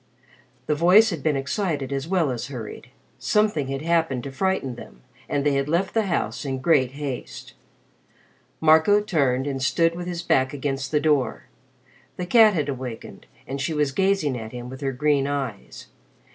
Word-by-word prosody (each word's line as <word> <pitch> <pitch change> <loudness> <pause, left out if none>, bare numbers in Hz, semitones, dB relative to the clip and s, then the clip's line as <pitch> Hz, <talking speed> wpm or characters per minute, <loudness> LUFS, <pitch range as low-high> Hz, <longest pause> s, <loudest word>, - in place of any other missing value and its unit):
The 150 - +1
voice 180 +8 +5
had 165 -5 -4
been 155 -1 +1
excited 140 -1 -2
as 135 +2 -3
well 170 -6 +1
as 120 0 -4
hurried. 120 -2 -8 0.3
Something 210 -10 +1
had 135 +1 -4
happened 160 -7 +1
to 140 - -6
frighten 190 -4 -1
them, 65 - -13 0.3
and 140 0 -1
they 145 - +3
had 140 +1 0
left 175 +4 0
the 220 -3 +1
house 115 - -2
in 135 -2 -3
great 130 -2 +2
haste. 140 -3 -6 1.1
Marco 160 +6 +5
turned 140 -10 0
and 135 -2 -3
stood 165 +5 +2
with 175 +1 -6
his 175 -1 -4
back 130 +1 +2
against 135 -1 -3
the 150 - +2
door. 145 -6 +1 0.7
The 180 - -3
cat 220 0 +6
had 150 -4 0
awakened 125 -4 -7 0.2
and 135 +1 -5
she 155 +3 -2
was 150 -2 +1
gazing 190 -5 +1
at 110 +1 -8
him 125 0 -7
with 130 +2 -9
her 135 -1 -1
green 140 +1 +1
eyes. 135 -7 -5
145 Hz, 175 wpm, -24 LUFS, 135-170 Hz, 1.1 s, cat